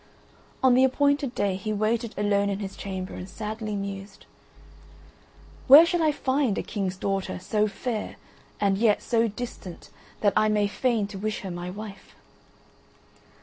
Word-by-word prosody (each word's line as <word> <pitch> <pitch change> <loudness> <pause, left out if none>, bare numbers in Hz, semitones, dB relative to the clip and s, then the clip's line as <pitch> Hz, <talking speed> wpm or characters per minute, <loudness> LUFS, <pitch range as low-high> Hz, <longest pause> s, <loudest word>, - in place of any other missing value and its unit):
On 260 -1 +6
the 255 +1 +5
appointed 280 0 +2
day 200 -2 0
he 195 +3 -4
waited 220 +2 -1
alone 200 0 +1
in 200 - -1
his 195 -1 -6
chamber 190 -1 -5
and 185 - -7
sadly 215 +1 -5
mused: 195 0 -6 1.4
"Where 290 +5 +10
shall 345 0 0
I 310 -1 +3
find 260 -6 0
a - - -1
king's 195 -3 -3
daughter 195 0 -2
so 210 +3 0
fair 215 +2 -4 0.4
and 195 -1 +1
yet 220 -2 +3
so 230 -1 +2
distant 210 -5 -8 0.3
that 205 -2 +3
I 215 - +3
may 210 -1 +2
feign 230 0 0
to 200 -2 -7
wish 215 +1 -3
her 190 - -6
my 175 +1 -5
wife?" 200 0 -9
210 Hz, 155 wpm, -26 LUFS, 195-235 Hz, 1.4 s, Where